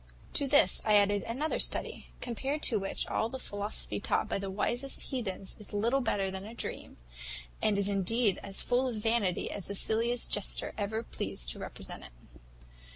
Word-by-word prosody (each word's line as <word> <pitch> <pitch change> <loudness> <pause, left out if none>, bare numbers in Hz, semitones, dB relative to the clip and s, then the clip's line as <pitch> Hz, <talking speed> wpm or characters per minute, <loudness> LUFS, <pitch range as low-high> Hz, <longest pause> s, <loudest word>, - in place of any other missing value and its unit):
"To 285 - +1
this 275 -9 +5
I 215 -1 +4
added 205 0 +4
another 280 +7 -1
study, - - +1
compared 270 +5 -3
to 220 - +3
which, 195 0 -2
all 220 - 0
the 265 - -4
philosophy 205 -4 -3
taught - - +1
by - - -1
the 195 0 -4
wisest 245 +10 0
heathens 200 -7 -3
is 210 - -6
little 235 +6 +2
better 200 -5 0
than 190 0 -5
a 220 +3 -9
dream, - - -6 0.6
and 210 -2 +2
is 200 -1 +3
indeed 205 +1 +2
as 195 -1 -1
full 250 +1 +2
of 245 - -2
vanity 215 -4 +1
as 200 - -4
the 200 - -3
silliest 230 +4 +2
jester 205 - +1
ever 220 +2 -2
pleased - - -2
to - - -7
represent - - -7
it. - - -13
215 Hz, 180 wpm, -31 LUFS, 200-240 Hz, 0.6 s, this